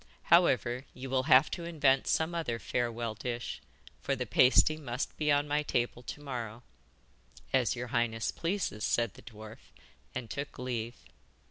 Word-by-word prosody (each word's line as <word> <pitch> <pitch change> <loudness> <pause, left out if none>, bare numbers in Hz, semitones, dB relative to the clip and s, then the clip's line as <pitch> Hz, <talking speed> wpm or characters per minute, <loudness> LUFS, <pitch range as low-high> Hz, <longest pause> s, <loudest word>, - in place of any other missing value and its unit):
However, 125 - +3
you 130 0 -7
will 130 -1 +1
have 135 0 +6
to 170 - -4
invent 145 -6 +2
some 160 +2 +1
other 160 -9 -2
farewell 115 -1 -2
dish, 120 +2 -5 0.4
for - - 0
the - - -3
pasty 130 +4 +5
must 140 -4 -4
be 150 -1 +1
on 145 0 +2
my 145 +1 +1
table 120 -4 -1
to 125 - -7
morrow.' 120 -4 -5 0.9
'As 130 -2 +2
your 125 0 -5
highness 115 -1 0
pleases,' 165 - -2
said 115 -4 +1
the - - -14
dwarf, 110 -1 -11 0.6
and 125 -2 -4
took 140 +5 -6
leave. 120 -2 -3
125 Hz, 155 wpm, -31 LUFS, 120-145 Hz, 0.9 s, have